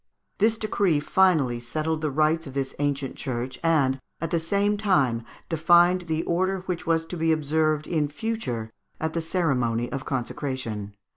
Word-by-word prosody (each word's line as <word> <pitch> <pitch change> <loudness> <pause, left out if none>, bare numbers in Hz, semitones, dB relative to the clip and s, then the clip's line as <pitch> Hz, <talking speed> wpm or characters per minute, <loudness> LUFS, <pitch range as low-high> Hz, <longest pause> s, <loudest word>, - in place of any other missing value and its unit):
This 220 +2 +3
decree 200 -7 +1
finally 150 -7 +3
settled 155 +6 -2
the 155 - 0
rights 155 +2 +1
of 135 - -9
this 135 -1 -2
ancient 140 -2 -1
church, 130 -1 -4
and 140 -5 +3 0.2
at 165 -1 -3
the 170 - +2
same 200 +5 +1
time 145 - +2 0.2
defined 175 +2 +4
the 160 0 0
order 185 +2 0
which 180 -3 -4
was 165 -1 +2
to 170 - -6
be 165 -1 +1
observed 155 0 +1
in 155 -4 0
future 145 - -3 0.3
at 160 0 -2
the 165 - -1
ceremony 125 -9 0
of 135 0 -3
consecration. 120 -6 -4
155 Hz, 160 wpm, -25 LUFS, 135-175 Hz, 0.3 s, defined